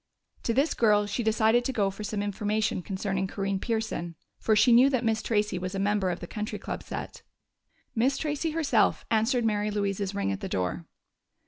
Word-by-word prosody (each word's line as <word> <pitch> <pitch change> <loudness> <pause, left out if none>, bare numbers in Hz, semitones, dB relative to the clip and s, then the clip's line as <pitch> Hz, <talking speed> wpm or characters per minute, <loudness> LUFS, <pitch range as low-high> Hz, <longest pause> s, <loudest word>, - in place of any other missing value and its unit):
To 230 - +1
this 280 +5 +2
girl 210 -2 +3
she 205 +4 -2
decided 220 +1 +3
to 265 - -1
go 205 -6 +1
for 195 +2 -8
some 205 -1 -2
information 210 0 -1
concerning 190 0 -2
Corinne 195 0 -2
Pearson, 220 -7 -3 0.2
for 220 - +2
she 215 +3 +5
knew 250 +4 +7
that 255 -3 0
Miss 220 -1 +1
Tracey 210 -5 0
was 185 +1 -4
a - - -2
member 200 -1 +1
of 175 - -3
the - - -5
Country 210 +4 -4
Club - - -5
set. - - -7 0.7
Miss 260 +4 +2
Tracey 300 +2 -1
herself 300 -8 +2
answered 225 +2 +2
Mary 210 -1 +1
Louise's 200 -1 -2
ring 200 - 0
at 95 - -3
the - - -5
door. 90 -1 -2
210 Hz, 195 wpm, -28 LUFS, 195-230 Hz, 0.7 s, knew